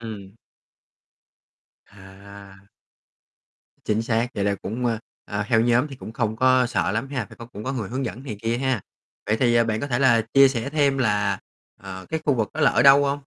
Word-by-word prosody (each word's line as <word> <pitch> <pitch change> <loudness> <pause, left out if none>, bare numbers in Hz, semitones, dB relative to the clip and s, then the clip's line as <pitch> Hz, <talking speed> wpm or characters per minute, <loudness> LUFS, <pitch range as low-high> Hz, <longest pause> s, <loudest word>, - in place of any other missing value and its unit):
Ừm. 105 -3 -9 1.5
À. 100 0 -14 1.3
Chính 110 +1 0
xác, 115 +1 0
vậy 100 - -1
là 100 0 +1
cũng, 115 +5 -4
ơ, 115 -2 0 0.3
ờ, 105 0 -3
theo 115 -2 +3
nhóm 120 +4 +2
thì 135 - -9
cũng 110 - -9
không 110 -2 -2
có 130 +1 +4
sợ 95 -4 -1
lắm 115 +5 -2
ha, 130 -6 -3
phải - - -14
có 115 - -10
cũng 110 -3 -10
có 130 - -2
người 115 -7 -4
hướng 130 +3 -3
dẫn 125 +1 -6
này 125 -7 -6
kia 115 +1 -1
ha. 130 -4 0 0.5
Vậy 110 - +1
thì, 120 -1 +2
à, 115 0 +4
bạn 110 -1 -2
có - - -3
thể 125 -3 -1
là 120 -4 +4
chia 135 0 +8
sẻ 130 +1 -3
thêm 140 -3 +1
là, 105 -5 +1 0.4
ờ, 95 -1 -9
cái 160 0 -2
khu 145 - +2
vực 110 -4 -1
đó 155 - -3
là 140 -3 +5
ở - - +2
đâu 140 +1 +7
hông? 140 +1 -1
115 Hz, 215 wpm, -23 LUFS, 105-130 Hz, 1.5 s, chia